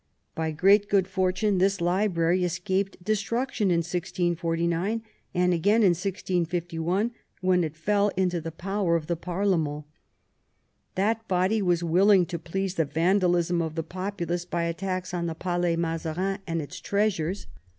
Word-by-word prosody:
By 160 Hz, 0 st, -2 dB
great 195 Hz, +6 st, +4 dB
good 195 Hz, -2 st, +3 dB
fortune 190 Hz, +1 st, +1 dB
this 195 Hz, +1 st, +2 dB
library 175 Hz, -1 st, +1 dB
escaped 185 Hz, +2 st, -2 dB
destruction 215 Hz, +1 st, 0 dB
in 170 Hz, -1 st, +3 dB
1649, 175 Hz, +2 st, -1 dB, 0.3 s
and 180 Hz, 0 st, +3 dB
again 205 Hz, +7 st, +3 dB
in 195 Hz, -, +6 dB
1651, 175 Hz, +1 st, -1 dB, 0.3 s
when 185 Hz, -1 st, +3 dB
it 155 Hz, -1 st, -4 dB
fell 200 Hz, +5 st, +2 dB
into 180 Hz, -2 st, +1 dB
the 165 Hz, +1 st, -5 dB
power 190 Hz, +1 st, -1 dB
of 165 Hz, -2 st, -1 dB
the 170 Hz, -, -1 dB
parlement. 170 Hz, -4 st, -1 dB, 1.1 s
That 220 Hz, +4 st, 0 dB
body 190 Hz, +4 st, +2 dB
was 175 Hz, -2 st, +1 dB
willing 185 Hz, +3 st, +5 dB
to 170 Hz, -1 st, -5 dB
please 185 Hz, +3 st, -3 dB
the 165 Hz, -4 st, +1 dB
vandalism 175 Hz, +2 st, +2 dB
of 160 Hz, -1 st, -3 dB
the 165 Hz, -, -2 dB
populace 180 Hz, -1 st, -3 dB
by 175 Hz, -1 st, -2 dB
attacks 185 Hz, +2 st, -3 dB
on 170 Hz, -1 st, -1 dB
the 165 Hz, -, -3 dB
Palais 175 Hz, 0 st, 0 dB
Mazarin 165 Hz, +4 st, -2 dB
and 165 Hz, -2 st, -1 dB
its 145 Hz, -, -8 dB
treasures. 200 Hz, -3 st, -1 dB
180 Hz, 145 wpm, -26 LUFS, 170-195 Hz, 1.1 s, in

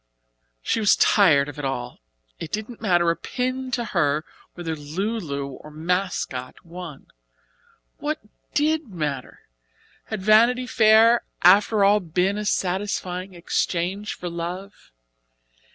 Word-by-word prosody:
She -, -, 0 dB
was 210 Hz, -2 st, +5 dB
tired 155 Hz, -9 st, +4 dB
of 145 Hz, 0 st, -8 dB
it -, -, -5 dB
all. 125 Hz, -2 st, -4 dB, 0.4 s
It 160 Hz, -, -7 dB
didn't 215 Hz, +2 st, -5 dB
matter 175 Hz, -5 st, +3 dB
a -, -, -1 dB
pin 255 Hz, -, -3 dB
to 240 Hz, -1 st, -2 dB
her 155 Hz, -6 st, 0 dB, 0.3 s
whether 165 Hz, -2 st, -4 dB
"Lu 185 Hz, +10 st, -3 dB
Lu" 140 Hz, -6 st, -4 dB
or 140 Hz, +3 st, -11 dB
"Mascot" 160 Hz, -5 st, -3 dB
won. 170 Hz, -4 st, -9 dB, 0.9 s
What 305 Hz, +1 st, -3 dB, 0.4 s
did 310 Hz, 0 st, +1 dB
matter! 150 Hz, -8 st, -4 dB, 0.6 s
Had 215 Hz, -4 st, -5 dB
Vanity 235 Hz, +4 st, +5 dB
Fair 225 Hz, 0 st, +5 dB, 0.2 s
after 200 Hz, +3 st, +5 dB
all 205 Hz, +1 st, +5 dB
been 185 Hz, +3 st, 0 dB
a 210 Hz, -, -4 dB
satisfying 185 Hz, -1 st, -2 dB
exchange 180 Hz, +3 st, -2 dB
for 180 Hz, -, -6 dB
love? 175 Hz, +4 st, -6 dB
185 Hz, 125 wpm, -23 LUFS, 165-215 Hz, 0.9 s, was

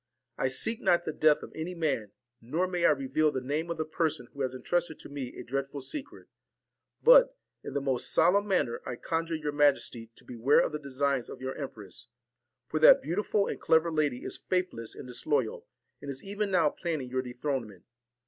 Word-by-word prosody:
I -, -, 0 dB
seek 220 Hz, -, +1 dB
not 175 Hz, -, +3 dB
the 155 Hz, -, -3 dB
death 155 Hz, -1 st, +3 dB
of -, -, -9 dB
any 165 Hz, +3 st, -5 dB
man, 140 Hz, -11 st, -1 dB, 0.3 s
nor 155 Hz, +11 st, -1 dB
may 180 Hz, -2 st, 0 dB
I -, -, +7 dB
reveal 145 Hz, +2 st, +2 dB
the 130 Hz, -, -2 dB
name 150 Hz, +6 st, -2 dB
of 170 Hz, -, -3 dB
the 155 Hz, -, -1 dB
person 155 Hz, -5 st, -1 dB
who 140 Hz, -, -6 dB
has 130 Hz, -1 st, -1 dB
intrusted 170 Hz, +4 st, -1 dB
to -, -, -10 dB
me 140 Hz, -3 st, -6 dB
a -, -, -6 dB
dreadful 135 Hz, +2 st, -3 dB
secret; 270 Hz, -, -6 dB, 0.8 s
but, -, -, +7 dB, 0.3 s
in 140 Hz, -, -7 dB
the 140 Hz, -, +1 dB
most 130 Hz, -3 st, 0 dB
solemn 200 Hz, +5 st, +4 dB
manner, 145 Hz, -12 st, 0 dB
I 125 Hz, -, -5 dB
conjure 165 Hz, +5 st, -2 dB
your 150 Hz, -2 st, -3 dB
majesty 140 Hz, -6 st, +1 dB
to -, -, -14 dB
beware 125 Hz, +4 st, +3 dB
of -, -, 0 dB
the 150 Hz, -, -4 dB
designs 140 Hz, -2 st, -1 dB
of -, -, -8 dB
your 130 Hz, +1 st, -4 dB
empress; 110 Hz, -, -7 dB, 0.6 s
for 155 Hz, -, -1 dB
that 155 Hz, -, +8 dB
beautiful 200 Hz, +5 st, 0 dB
and -, -, -5 dB
clever 160 Hz, +1 st, +3 dB
lady 150 Hz, -5 st, 0 dB
is -, -, -3 dB
faithless 180 Hz, -11 st, -2 dB
and -, -, -9 dB
disloyal, 125 Hz, 0 st, -1 dB, 0.3 s
and 140 Hz, -, -7 dB
is 135 Hz, -1 st, -5 dB
even 205 Hz, +1 st, -2 dB
now 170 Hz, -5 st, +3 dB
planning 155 Hz, -8 st, -4 dB
your 130 Hz, 0 st, 0 dB
dethronement. 125 Hz, -5 st, -4 dB
145 Hz, 195 wpm, -29 LUFS, 130-165 Hz, 0.8 s, that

